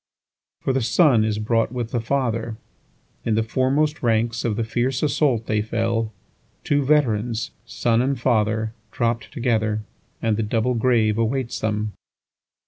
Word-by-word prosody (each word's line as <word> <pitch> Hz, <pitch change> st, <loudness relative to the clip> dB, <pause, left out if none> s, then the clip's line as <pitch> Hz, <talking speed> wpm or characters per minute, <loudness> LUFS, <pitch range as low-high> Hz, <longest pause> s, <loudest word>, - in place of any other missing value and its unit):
5For 135 Hz, -, +2 dB
the 135 Hz, -, +1 dB
son 120 Hz, 0 st, +4 dB
is 110 Hz, -1 st, 0 dB
brought 115 Hz, +1 st, +1 dB
with 120 Hz, -2 st, -4 dB
the 120 Hz, -, 0 dB
father; 115 Hz, -3 st, -1 dB, 0.7 s
In 115 Hz, -, +1 dB
the 110 Hz, -, +2 dB
foremost 135 Hz, +5 st, +1 dB
ranks 115 Hz, 0 st, +1 dB
of 110 Hz, -3 st, 0 dB
the 115 Hz, -, -1 dB
fierce 120 Hz, +4 st, -1 dB
assault 140 Hz, -6 st, +2 dB
they 105 Hz, -1 st, +1 dB
fell; 115 Hz, 0 st, -1 dB, 0.5 s
Two 145 Hz, -1 st, +2 dB
veterans, 120 Hz, -6 st, +1 dB, 0.2 s
son 115 Hz, -1 st, +1 dB
and 135 Hz, 0 st, 0 dB
father, 110 Hz, -2 st, +1 dB, 0.2 s
dropt 115 Hz, 0 st, -1 dB
together, 110 Hz, -5 st, 0 dB, 0.4 s
And 110 Hz, -2 st, 0 dB
the -, -, 0 dB
double 110 Hz, +3 st, 0 dB
grave 115 Hz, -2 st, +2 dB
awaits 120 Hz, +2 st, -1 dB
them. 105 Hz, -1 st, -1 dB
115 Hz, 145 wpm, -23 LUFS, 110-125 Hz, 0.7 s, son